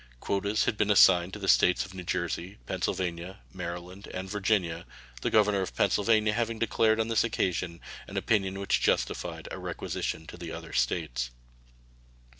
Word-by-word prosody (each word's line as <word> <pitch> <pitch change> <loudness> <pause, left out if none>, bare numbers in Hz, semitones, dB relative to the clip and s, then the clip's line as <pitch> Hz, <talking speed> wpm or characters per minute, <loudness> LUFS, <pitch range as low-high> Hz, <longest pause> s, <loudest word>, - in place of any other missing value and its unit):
Quotas 100 - 0
had 105 - 0
been 105 - +1
assigned 95 -3 +6
to - - -4
the 100 -2 -5
States 90 0 +4
of 95 - -12
New 95 -1 -7
Jersey, 90 +2 -3
Pennsylvania, 90 0 -3
Maryland, 90 +2 -7
and 95 +1 -5
Virginia, 95 -4 0 0.3
the - - 0
governor 105 -2 +3
of 95 - -4
Pennsylvania 105 0 +3
having 115 0 -1
declared 110 0 +2
on 110 - +1
this 115 -1 +2
occasion 90 -6 -1 0.3
an - - -6
opinion 95 -3 +1
which 100 - +1
justified - - -1
a - - -5
requisition 80 - -4
to 85 - -10
the 85 -2 -7
other - - -8
States. 60 -8 0
95 Hz, 160 wpm, -29 LUFS, 85-105 Hz, 0.3 s, assigned